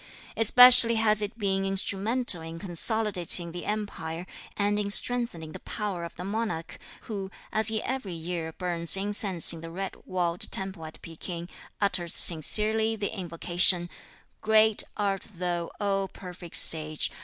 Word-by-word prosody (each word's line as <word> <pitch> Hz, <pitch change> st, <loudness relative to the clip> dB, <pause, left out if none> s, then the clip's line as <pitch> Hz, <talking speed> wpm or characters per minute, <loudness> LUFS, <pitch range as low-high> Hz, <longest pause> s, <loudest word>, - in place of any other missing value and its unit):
Especially 240 Hz, +1 st, +8 dB
has 215 Hz, -1 st, +3 dB
it 210 Hz, +2 st, -6 dB
been 195 Hz, -3 st, -3 dB
instrumental 195 Hz, +2 st, -1 dB
in 165 Hz, 0 st, -10 dB
consolidating 180 Hz, -2 st, +3 dB
the 175 Hz, +1 st, -9 dB
empire, 180 Hz, -6 st, -6 dB, 0.3 s
and 205 Hz, 0 st, -1 dB
in 205 Hz, -1 st, -4 dB
strengthening 205 Hz, -8 st, +1 dB
the -, -, -11 dB
power 200 Hz, -5 st, -6 dB
of 170 Hz, -, -12 dB
the -, -, -9 dB
monarch, 210 Hz, -5 st, -6 dB, 0.2 s
who, 195 Hz, -4 st, -8 dB, 0.2 s
as 220 Hz, -1 st, -1 dB
he 220 Hz, -1 st, -1 dB
every 255 Hz, -8 st, -6 dB
year 165 Hz, 0 st, -6 dB
burns 170 Hz, 0 st, 0 dB
incense 195 Hz, -3 st, +4 dB
in 165 Hz, -, -10 dB
the 165 Hz, -, -10 dB
red 190 Hz, +3 st, -7 dB
walled 175 Hz, -1 st, -3 dB
temple 190 Hz, -4 st, -4 dB
at 155 Hz, -, -14 dB
Pekin, 170 Hz, +1 st, -9 dB, 0.3 s
utters 185 Hz, -4 st, -2 dB
sincerely 215 Hz, +7 st, +1 dB
the 205 Hz, 0 st, -6 dB
invocation: 175 Hz, 0 st, 0 dB, 0.5 s
"Great 220 Hz, 0 st, +2 dB, 0.2 s
art 200 Hz, -2 st, -4 dB
thou, 175 Hz, -1 st, -5 dB
O 195 Hz, -1 st, -2 dB
perfect 180 Hz, -2 st, -11 dB
Sage! 155 Hz, -1 st, +3 dB
195 Hz, 145 wpm, -25 LUFS, 170-215 Hz, 0.5 s, Especially